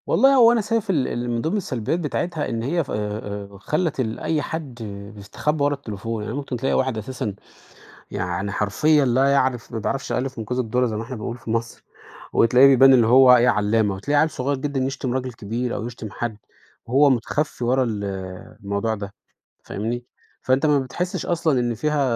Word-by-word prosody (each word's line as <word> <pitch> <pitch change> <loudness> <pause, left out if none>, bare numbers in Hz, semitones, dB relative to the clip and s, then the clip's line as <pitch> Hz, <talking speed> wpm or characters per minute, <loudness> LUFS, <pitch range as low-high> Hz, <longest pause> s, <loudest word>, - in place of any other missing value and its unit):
والله 275 +1 +5
هو 235 -3 +7
أنا 235 -2 +2
شايف 220 0 -1
ال 150 -9 +1
اللي 120 0 -3
من 120 -1 -1
ضمن 165 - -1
السلبيات 145 - -2
بتاعتها 160 0 -2
إن 115 -2 -3
هي 165 +7 0
ف - - -10
آآ - - -1 0.6
آآ - - -11
خلّت 155 - -1
ال 110 -3 -2
أي 155 -2 0
حد 150 -5 -5 0.4
بيستخبّى 145 +9 -2
ورا 145 0 +2
التليفون، 115 -4 -5
يعني 105 - -4
ممكن 140 -3 -4
تلاقي 130 - -1
واحد 130 -3 +1
أساسًا 110 -2 -4 0.8
يعني 90 +3 -3
حرفيًا 145 +10 +2
لا 130 +2 +3
يعرف 130 -3 0
ما 115 - -3
بيعرفش 135 +5 -3
الألِف 130 0 -2
من 110 - -3
كوز 125 +4 -3
الدرة 125 +1 +1
زي 110 -2 -3
ما 110 - -3
إحنا 125 +3 -7
بنقول 115 +2 -5
في 115 - -8
مصر، 115 +1 -3 0.5
وتلاقيه 125 +4 +6
بيبان 135 0 +7
إن 125 -3 +6
هو 125 +2 +7
إيه 120 +1 +4
عَلّامة. 105 -2 +2
وتلاقي 145 +10 +1
عَيّل 160 - +2
صغير 140 +1 -2
جدًا 140 0 -2
يشتم 130 -1 -2
راجل 130 -1 -2
كبير 115 +3 -3
أو 110 - -4
يشتم 115 -3 -7
حد 110 +1 -4 0.5
وهو 140 +4 +4
مُتخفّي 130 +2 -1
ورا 130 +2 +2
ال 105 -4 -3 0.6
الموضوع 100 +3 -1
ده، 100 -1 -7 0.5
فاهمني؟ 120 +4 -4 0.4
فأنت 130 +4 +2
ما 145 -2 +4
بتحسّش 175 +8 -3
أصلًا 160 -6 +1
إن 120 -1 0
فيها 150 +5 0
125 Hz, 195 wpm, -22 LUFS, 115-145 Hz, 0.8 s, هو